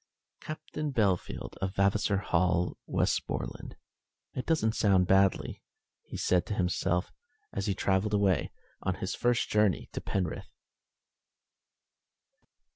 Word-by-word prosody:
"Captain 155 Hz, -1 st, -5 dB
Bellfield, 100 Hz, -8 st, 0 dB
of 95 Hz, 0 st, -3 dB
Vavasor 100 Hz, +1 st, +2 dB
Hall, 90 Hz, -2 st, +1 dB
Westmoreland. -, -, -1 dB, 0.6 s
It 125 Hz, -, -4 dB
don't 110 Hz, -9 st, +2 dB
sound 95 Hz, -3 st, +4 dB
badly," 95 Hz, +1 st, +2 dB, 0.4 s
he -, -, -8 dB
said 90 Hz, -1 st, +2 dB
to 105 Hz, -, -2 dB
himself, 90 Hz, -1 st, 0 dB, 0.4 s
as 100 Hz, +1 st, -2 dB
he 100 Hz, -, +1 dB
travelled 100 Hz, +3 st, +1 dB
away 100 Hz, -3 st, +2 dB, 0.3 s
on 95 Hz, -1 st, -1 dB
his 95 Hz, -, -3 dB
first 120 Hz, 0 st, +1 dB
journey 105 Hz, -3 st, +2 dB
to -, -, -5 dB
Penrith. 90 Hz, -4 st, -3 dB
95 Hz, 115 wpm, -30 LUFS, 90-105 Hz, 0.6 s, sound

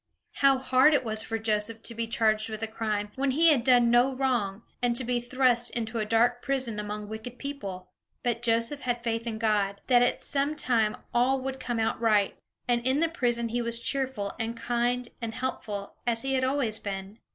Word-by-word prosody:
How 275 Hz, -1 st, +5 dB
hard 260 Hz, +3 st, +4 dB
it 270 Hz, -, +1 dB
was 220 Hz, -2 st, +1 dB
for 225 Hz, 0 st, -2 dB
Joseph 220 Hz, 0 st, -1 dB
to 235 Hz, -, -4 dB
be 230 Hz, 0 st, -3 dB
charged 220 Hz, -1 st, +1 dB
with 220 Hz, 0 st, -5 dB
a -, -, 0 dB
crime, 215 Hz, -2 st, -3 dB
when 275 Hz, +1 st, +1 dB
he 320 Hz, +5 st, +5 dB
had 275 Hz, -6 st, +3 dB
done 245 Hz, -2 st, +5 dB
no 245 Hz, +3 st, +4 dB
wrong, 235 Hz, -6 st, -1 dB, 0.2 s
and 240 Hz, -1 st, +1 dB
to 255 Hz, -, +2 dB
be 245 Hz, 0 st, -1 dB
thrust 245 Hz, -1 st, +2 dB
into 225 Hz, 0 st, -3 dB
a 215 Hz, -, -2 dB
dark 235 Hz, +2 st, +2 dB
prison 255 Hz, -6 st, -2 dB
among 210 Hz, 0 st, -5 dB
wicked 220 Hz, +3 st, -7 dB
people! 200 Hz, -11 st, -6 dB, 0.3 s
But 235 Hz, -1 st, 0 dB
Joseph 230 Hz, +4 st, +1 dB
had 245 Hz, -1 st, -2 dB
faith 230 Hz, 0 st, -2 dB
in 220 Hz, -1 st, -3 dB
God, 205 Hz, -3 st, 0 dB
that 245 Hz, -2 st, +5 dB
at 245 Hz, -, +1 dB
some 285 Hz, +2 st, -1 dB
time 225 Hz, -7 st, +1 dB, 0.2 s
all 255 Hz, +3 st, +3 dB
would 265 Hz, 0 st, -4 dB
come 240 Hz, -2 st, -3 dB
out 225 Hz, +1 st, -1 dB
right; 210 Hz, -3 st, +3 dB, 0.3 s
and 240 Hz, -1 st, +2 dB
in 260 Hz, +3 st, +2 dB
the 330 Hz, 0 st, +2 dB
prison 240 Hz, -6 st, -1 dB
he 240 Hz, +2 st, -1 dB
was 235 Hz, 0 st, -1 dB
cheerful, 260 Hz, -6 st, -2 dB
and 230 Hz, +1 st, -3 dB
kind, 240 Hz, +1 st, 0 dB
and 225 Hz, -1 st, -4 dB
helpful, 210 Hz, -6 st, -4 dB
as 230 Hz, 0 st, +1 dB
he 270 Hz, 0 st, -1 dB
had 260 Hz, -1 st, +1 dB
always 260 Hz, -5 st, +1 dB
been. 195 Hz, +2 st, -6 dB
235 Hz, 210 wpm, -28 LUFS, 220-255 Hz, 0.3 s, How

